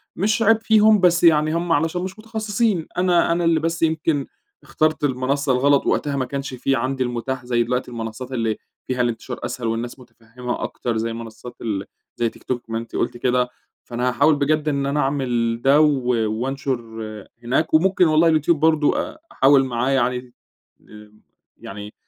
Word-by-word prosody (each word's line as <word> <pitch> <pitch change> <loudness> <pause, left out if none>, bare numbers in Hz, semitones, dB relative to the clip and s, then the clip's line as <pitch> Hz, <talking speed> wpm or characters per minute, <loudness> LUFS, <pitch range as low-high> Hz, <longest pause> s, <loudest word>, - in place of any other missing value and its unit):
مش 210 +4 0
عيب 225 0 +4
فيهم، 220 -1 +5
بس 175 -2 +3
يعني 155 -2 +4
هم 170 +1 -1
علشان 165 +2 +1
مش 190 +3 -6
متخصصين. 215 -4 -1
أنا 180 -2 +3
أنا 170 +1 +1
اللي 165 -1 +3
بس 165 +1 -2
يمكن 160 -3 0 0.4
اخترت 155 -1 0
المنصة 140 +1 0
الغلط، 140 +2 +3
وقتها 145 -1 0
ما 130 -2 -1
كانش 140 0 -5
في 130 +2 0
عندي 130 +1 -1
المتاح 125 +1 -4
زي 120 -1 +1
دلوقتي 125 +1 -2
المنصات 115 +2 -6
اللي 115 -4 -1 0.3
فيها 130 -1 -1
الانتشار 120 +1 -3
أسهل 120 -2 -4
والناس 115 +3 -3
متفهمة 125 0 -7
أكتر، 120 -2 -3
زي 115 +1 -2
منصات 115 +1 -9
ال 100 -4 -3 0.3
زي 120 -1 0
تيك - - -18
توك 120 -2 -4
ما 115 - -2
أنتِ 115 +1 -7
قلتِ - - -1
كده. 125 0 +1 0.3
فأنا 125 +1 -2
هاحاول 150 +5 +3
بجد 150 +1 0
إن 140 -1 -1
أنا 140 +2 0
أعمل 120 -5 0
ده 140 +4 +5
و 140 -5 +2 0.2
وأنشر 130 +3 -2 0.6
هناك، 135 +7 0
وممكن 180 +3 +4
والله 155 +2 +4
اليوتيوب 160 0 +2
برضو 155 -1 +3
أ - - -3
أحاول 135 0 +4
معاه 125 0 -1
يعني 125 -2 0 0.6
آمم 105 0 -15 0.4
يعني 105 +1 -9
135 Hz, 170 wpm, -21 LUFS, 120-160 Hz, 0.6 s, فيهم